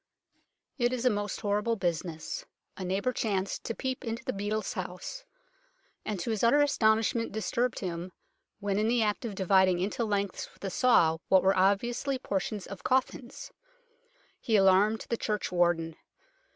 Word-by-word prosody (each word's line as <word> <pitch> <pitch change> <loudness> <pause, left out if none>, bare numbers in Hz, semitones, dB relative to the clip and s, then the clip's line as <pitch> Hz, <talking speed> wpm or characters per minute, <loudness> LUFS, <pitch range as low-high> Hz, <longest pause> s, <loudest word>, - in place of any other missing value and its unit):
It 240 0 +2
is 255 0 -2
a 250 - +5
most 205 -1 -3
horrible 210 +3 0
business. 175 - -3 0.3
A 190 - -6
neighbour 195 +7 -1
chanced 200 -4 -2
to 230 - -3
peep 260 0 -3
into 230 +1 -4
the 255 - -1
beadle's 205 +2 -2
house, 185 - -6 0.8
and 210 -3 -3
to 230 - -2
his 220 0 -2
utter 235 +5 +5
astonishment 230 -5 +2
disturbed 235 +3 -1
him 175 -1 -4 0.5
when 200 -1 -1
in 215 - +1
the 235 0 +3
act 210 +3 -1
of 215 -4 -4
dividing 190 -1 +3
into 200 +6 -1
lengths 200 -3 -2
with - - -20
a 195 - -3
saw 165 -9 +4
what 190 -1 +5
were 190 +1 +4
obviously 235 +8 +1
portions 200 -3 -3
of 200 - -9
coffins. 260 0 -1 0.9
He 225 -4 0
alarmed 200 +2 +4
the 235 - 0
churchwarden. 175 -6 0
205 Hz, 155 wpm, -29 LUFS, 190-235 Hz, 0.9 s, a